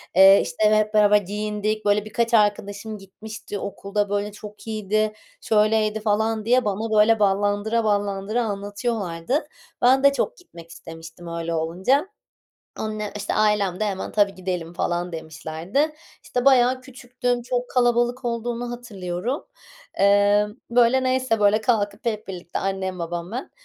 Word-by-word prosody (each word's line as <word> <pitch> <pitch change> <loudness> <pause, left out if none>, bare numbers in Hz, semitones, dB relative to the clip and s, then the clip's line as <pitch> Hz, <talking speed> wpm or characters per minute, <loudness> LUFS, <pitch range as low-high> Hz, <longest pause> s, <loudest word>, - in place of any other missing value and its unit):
Eee, 195 +1 +8
işte, 215 +6 +2
hep 215 0 +1
beraber 210 -1 +6
giyindik. 210 +2 -3
Böyle, 205 0 +2
birkaç 230 +2 -1
arkadaşım 205 0 +1
gitmişti 205 +1 -8
okulda, 200 +1 -3
böyle, 205 +1 -1
"Çok 210 +1 -12
iyiydi, 215 0 0 0.3
şöyleydi." 215 0 +2
falan 220 +1 0
diye 250 +1 +3
bana 215 +2 -2
böyle 225 +1 +5
ballandıra 205 +3 +1
ballandıra 205 +2 0
anlatıyorlardı. 205 - -2 0.3
Ben 265 +2 +5
de 280 0 +6
çok - - -2
gitmek 170 - -14
istemiştim 165 +1 -11
öyle 170 0 -3
olunca. 185 - +1 0.7
Anne 215 -1 -4
işte, 205 -1 -3
ailem 210 -3 +1
de - - +2
hemen, 195 -2 -3
"Tabii, 205 -2 +2
gidelim." 180 -3 -4
falan 175 0 -2
demişlerdi. 165 - -2 0.3
İşte, 250 -1 -2
bayağı 255 -1 +5
küçüktüm, 245 -1 -3
çok 245 0 -3
kalabalık 245 +1 +1
olduğunu 240 0 -3
hatırlıyorum. 225 - -4 0.6
Eee, 205 +1 +4 0.2
böyle, 245 +2 +4
neyse, 255 -3 +1
böyle, 205 +1 +4
kalkıp 210 -2 0
hep 220 -2 -2
birlikte 175 -2 -5
annem 190 -1 -3
babam 170 +1 -4
ben, 255 +4 -5
210 Hz, 135 wpm, -23 LUFS, 195-235 Hz, 0.7 s, Eee